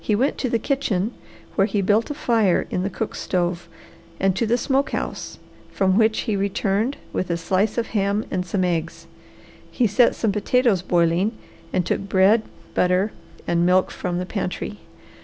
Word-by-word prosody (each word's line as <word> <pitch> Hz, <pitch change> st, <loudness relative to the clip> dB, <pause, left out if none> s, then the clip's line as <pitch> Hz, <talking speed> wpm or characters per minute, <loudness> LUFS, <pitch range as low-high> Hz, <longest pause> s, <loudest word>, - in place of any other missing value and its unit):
He 210 Hz, -, +1 dB
went 260 Hz, +7 st, 0 dB
to 255 Hz, -, -1 dB
the 230 Hz, -, +2 dB
kitchen, 225 Hz, -6 st, -1 dB, 0.4 s
where 195 Hz, -, +3 dB
he 205 Hz, -1 st, -1 dB
built 205 Hz, +6 st, +2 dB
a 295 Hz, -, -3 dB
fire 225 Hz, -9 st, +2 dB
in 180 Hz, -, 0 dB
the 195 Hz, -, -1 dB
cook 215 Hz, +3 st, -4 dB
stove, 175 Hz, -1 st, -2 dB, 0.5 s
and 190 Hz, -1 st, +2 dB
to 230 Hz, +3 st, 0 dB
the 235 Hz, +2 st, +3 dB
smoke 270 Hz, +3 st, +1 dB
house, -, -, -4 dB, 0.3 s
from 190 Hz, -1 st, +2 dB
which 220 Hz, +1 st, +3 dB
he 220 Hz, -4 st, -1 dB
returned 200 Hz, +5 st, 0 dB, 0.2 s
with 185 Hz, -, -2 dB
a 170 Hz, -, 0 dB
slice 185 Hz, +6 st, 0 dB
of 230 Hz, -1 st, -1 dB
ham 205 Hz, 0 st, 0 dB
and 185 Hz, -2 st, 0 dB
some 185 Hz, +2 st, -1 dB
eggs. 165 Hz, -1 st, -2 dB, 0.6 s
He 250 Hz, -, +1 dB
set 225 Hz, +3 st, +4 dB
some 220 Hz, -, 0 dB
potatoes 215 Hz, -1 st, +2 dB
boiling 175 Hz, +4 st, +2 dB, 0.4 s
and 180 Hz, -2 st, 0 dB
took -, -, 0 dB
bread, 195 Hz, +3 st, +4 dB, 0.3 s
butter 180 Hz, +3 st, +2 dB, 0.3 s
and 170 Hz, 0 st, +1 dB
milk 180 Hz, +1 st, +3 dB
from 175 Hz, -, -3 dB
the 180 Hz, -, -2 dB
pantry. 200 Hz, +1 st, -4 dB
195 Hz, 175 wpm, -22 LUFS, 180-225 Hz, 0.6 s, set